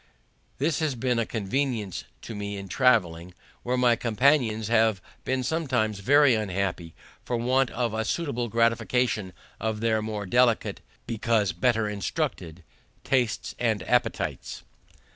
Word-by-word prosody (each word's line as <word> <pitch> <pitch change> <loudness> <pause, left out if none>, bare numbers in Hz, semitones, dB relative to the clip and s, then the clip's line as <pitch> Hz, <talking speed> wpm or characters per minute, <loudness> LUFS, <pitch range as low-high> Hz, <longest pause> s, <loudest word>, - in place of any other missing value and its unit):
This 150 +4 0
has 155 -4 0
been 125 0 0
a 115 - -1
convenience 115 -2 -2 0.2
to 115 - -7
me 100 -1 -5
in 100 0 -7
traveling, 90 -8 +1 0.3
where 125 +1 -1
my 125 -1 +4
companions 115 -2 +2
have 110 -3 +3 0.3
been 130 0 0
sometimes 125 -9 -1
very 140 +5 +5
unhappy 95 -5 -2 0.3
for 120 - -2
want 130 +2 +2
of 120 -2 -2
a 110 0 -1
suitable 125 -2 -2
gratification 115 -2 +1 0.3
of 110 0 -2
their 110 -1 +1
more 105 -1 -4
delicate, 120 +3 +2 0.2
because 110 -3 +1
better 110 +3 +1
instructed, 90 -4 -3 0.4
tastes 125 -4 0
and 110 -5 0
appetites. 115 - -1
115 Hz, 130 wpm, -26 LUFS, 105-125 Hz, 0.4 s, very